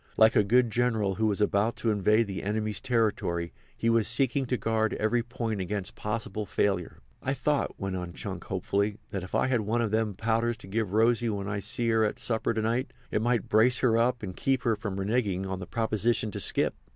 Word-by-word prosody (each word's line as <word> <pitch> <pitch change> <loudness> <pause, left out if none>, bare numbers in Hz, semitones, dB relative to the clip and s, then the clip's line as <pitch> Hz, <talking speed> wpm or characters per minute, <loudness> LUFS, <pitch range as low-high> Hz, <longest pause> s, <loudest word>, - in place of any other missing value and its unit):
Like 110 +2 +6
a 105 - +5
good 120 +3 +3
general 110 -4 +1
who 110 +3 0
was 105 -1 0
about 105 +2 +2
to 115 - 0
invade 105 +2 +3
the 100 -2 -5
enemy's 105 0 -2
territory 105 -9 0 0.2
he 115 - -1
was 115 -2 +3
seeking 135 0 +1
to 125 - 0
guard 110 0 0
every 120 +3 +1
point 115 -3 -3
against 95 +1 -3
possible 105 -1 -3
failure. 95 -3 -1 0.2
"I 135 +1 -1
thought," 140 +2 -1
went 95 -1 -3
on 90 -1 -5
Chunk 95 -2 -6
hopefully, 100 +2 -1
"that 95 - -3
if 90 - -6
I - - +3
had 125 -3 +1
one 110 +3 0
of 115 -3 0
them 110 -2 0
powders 115 +2 0
to 95 - -13
give 105 -1 -2
Rosy 115 +2 +3
when 100 -2 -3
I 100 0 -2
see 115 +4 -1
her 110 -1 +3
at 105 - 0
supper 115 -1 0
to 110 -1 -1
night 120 +4 -1 0.2
it 105 - +1
might 120 -2 +1
brace 120 +3 +4
her 120 -3 +3
up 120 0 +1
and 95 -2 -5
keep 135 -1 0
her 115 -3 +2
from 100 -2 -5
reneging 100 -2 0
on 95 -1 -4
the 90 - -7
proposition 110 -1 0
to - - -5
skip. - - +2
110 Hz, 220 wpm, -28 LUFS, 100-115 Hz, 0.2 s, Like